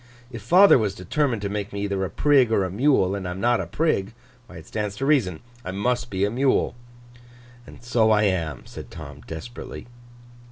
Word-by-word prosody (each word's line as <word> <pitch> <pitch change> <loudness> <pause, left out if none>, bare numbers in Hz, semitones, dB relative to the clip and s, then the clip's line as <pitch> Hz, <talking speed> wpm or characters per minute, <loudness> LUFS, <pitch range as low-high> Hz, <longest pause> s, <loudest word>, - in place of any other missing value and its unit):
If 115 -3 -7
father 180 - +6
was 105 -3 -1
determined 115 - -1
to - - 0
make 100 0 -4
me 100 0 -4
either 100 -1 -1
a 95 - -2
Prig 135 - +3
or 100 -4 +2
a 90 - -4
Mule, 105 -4 +2
and 100 -2 -4
I - - -3
am 90 +1 -5
not 120 +3 +2
a - - -6
Prig, 130 -11 0 0.3
why, 90 - -12
it 80 - -11
stands 105 -2 -4
to 135 - -3
reason, 120 - +1 0.2
I - - -6
must 120 +6 -1
be 95 0 0
a 105 - -2
Mule. 130 +3 +1 0.9
And - - -14
so 120 -2 +2
I 105 -1 +4
am,' 85 - -1
said - - -10
Tom, 75 -2 -10
desperately. 80 +10 -8
105 Hz, 205 wpm, -24 LUFS, 95-120 Hz, 0.9 s, father